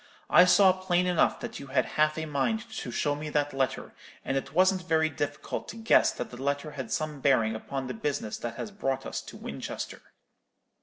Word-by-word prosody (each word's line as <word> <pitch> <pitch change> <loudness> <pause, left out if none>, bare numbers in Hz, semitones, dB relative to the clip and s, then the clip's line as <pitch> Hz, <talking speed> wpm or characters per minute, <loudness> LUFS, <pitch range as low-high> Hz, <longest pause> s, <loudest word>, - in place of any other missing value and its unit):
I 180 - +8
saw 185 +1 +6
plain 180 -1 +1
enough 180 -2 +2
that - - -6
you 140 - -9
had 130 -1 +1
half 155 0 +1
a 160 - -2
mind 220 +11 -1
to - - -4
show 145 +5 0
me 150 +1 -5
that 145 -1 0
letter; 135 -1 -2 0.3
and 135 - -1
it 135 - -2
wasn't 185 +2 +3
very 160 -1 +3
difficult 145 -1 -4
to - - -7
guess 225 0 +4
that - - -5
the 125 +1 -9
letter 145 +2 -1
had 135 -3 -6
some 155 -2 -2
bearing 115 -6 +3
upon 135 +4 -4
the 125 - -4
business 115 -3 -2
that 120 -1 -5
has 210 - -5
brought 135 -10 -2
us - - -4
to - - -11
Winchester.' - - -6
145 Hz, 205 wpm, -28 LUFS, 135-180 Hz, 0.3 s, I